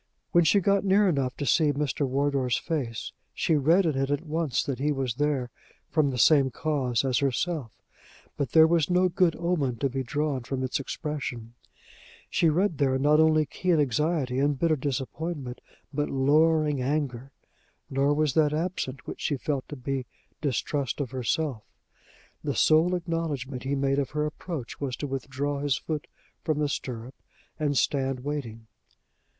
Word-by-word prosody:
When 175 - +5
she 200 +6 +5
got 200 +1 +2
near 200 +1 +4
enough 135 -7 0
to 145 - -3
see 150 +1 +3
Mr. 145 0 -1
Wardour's 135 -2 +1
face, 135 -9 -3 0.2
she 160 - +1
read 165 +7 +4
in 155 -4 +1
it 135 0 0
at 145 +3 -1
once 155 -4 0
that 135 -3 -3
he 145 +2 +1
was 135 -4 -1
there 135 -2 -1 0.4
from 155 -3 +3
the 130 - -3
same 135 +2 +5
cause 130 -3 -1
as 125 -3 +2
herself; 135 - -2 0.6
but 140 - -3
there 160 -1 +8
was 165 -1 +2
no 180 +1 +3
good 175 -1 +2
omen 165 -7 0
to 135 +4 -1
be 135 +1 -2
drawn 145 +1 -1
from 130 +2 -3
its 130 - -1
expression: 135 -5 -5 0.8
she 165 - +3
read 170 0 +1
there 135 -2 +2
not 150 +3 +4
only 155 -1 +4
keen 175 +3 0
anxiety 145 -1 +1
and 145 0 +2
bitter 165 +2 +2
disappointment, 140 0 -4 0.3
but 145 +1 -1
lowering 150 +1 +3
anger; 135 -2 -2 0.6
nor 135 +2 +1
was 150 -2 +1
that 150 -1 +3
absent 155 -6 -3
which - - -7
she 145 - 0
felt 140 0 -3
to 145 - -6
be 130 -1 -3 0.3
distrust 140 -1 -1
of 135 -4 -3
herself. 130 0 -1 0.8
The - - -2
sole 165 +4 +4
acknowledgment 160 -7 -3
he 135 +1 -1
made 135 0 +1
of 135 - -1
her 150 0 -1
approach 150 -4 -6
was 135 -3 -2
to 145 - -5
withdraw 140 +1 -3
his 140 -3 +1
foot 155 -2 -4 0.4
from 155 -2 0
the 150 -1 0
stirrup 125 -2 -5 0.5
and 145 -2 0
stand 135 -1 0
waiting. 125 -6 -5
145 Hz, 165 wpm, -27 LUFS, 130-155 Hz, 0.8 s, there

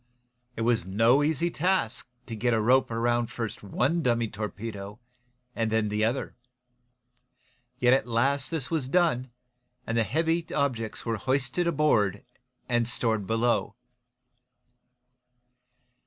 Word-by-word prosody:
It - - -4
was 115 -3 +2
no 115 +9 +3
easy 160 +3 +1
task 170 - 0 0.2
to 115 - -6
get 120 +2 +1
a - - +1
rope 130 +4 +3
around 120 0 0
first 115 -3 -5
one 135 - 0
dummy 120 -4 +1
torpedo, 105 -1 -6 0.6
and 115 -1 0
then 110 -1 +1
the 105 +1 0
other. 120 +5 -1 1.4
Yet 125 -1 +4
at 135 - +2
last 135 +4 +1
this 150 -7 -3
was 150 -6 -1
done, 145 -7 +2 0.6
and 115 - -2
the 115 - +3
heavy 160 - 0
objects 125 -6 -2
were 115 -1 -1
hoisted 135 - 0
aboard 120 - +2 0.4
and 120 -1 +1
stored 110 -5 0
below. 115 +2 +1
120 Hz, 125 wpm, -27 LUFS, 110-140 Hz, 1.4 s, Yet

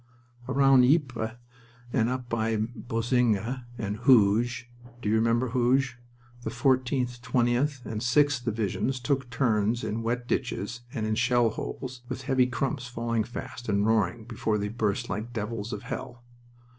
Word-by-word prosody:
Round 135 -1 +5
Ypres, 125 -6 +2 0.6
and 115 -3 +2
up 130 -1 -3
by 115 -1 0
Boesinghe 120 +1 0
and 105 -2 -3
Hooge 120 0 +4 0.4
you 105 - +1
remember 115 +3 +2
Hooge? 125 +1 +1 0.4
the 115 - -3
14th, 125 0 +1
20th, 125 +3 +1
and 110 -1 -4
6th 135 +2 +3
Divisions 110 +4 -1
took 135 0 -1
turns 115 -1 +1
in 110 +2 -2
wet 120 +1 -2
ditches 120 -2 -2
and 115 -6 -2
in 110 - 0
shell 120 0 +3
holes, 130 +2 -6
with 130 0 -5
heavy 130 -1 +3
crumps 130 +1 -2
falling 115 -2 -1
fast 120 +1 -7
and 100 0 +2
roaring 110 -1 +1
before 115 -2 -1
they 105 0 -2
burst 105 -2 -1
like 110 +5 -4
devils 110 -1 -4
of 105 - -5
hell. 120 0 -6
120 Hz, 145 wpm, -27 LUFS, 110-130 Hz, 0.6 s, Round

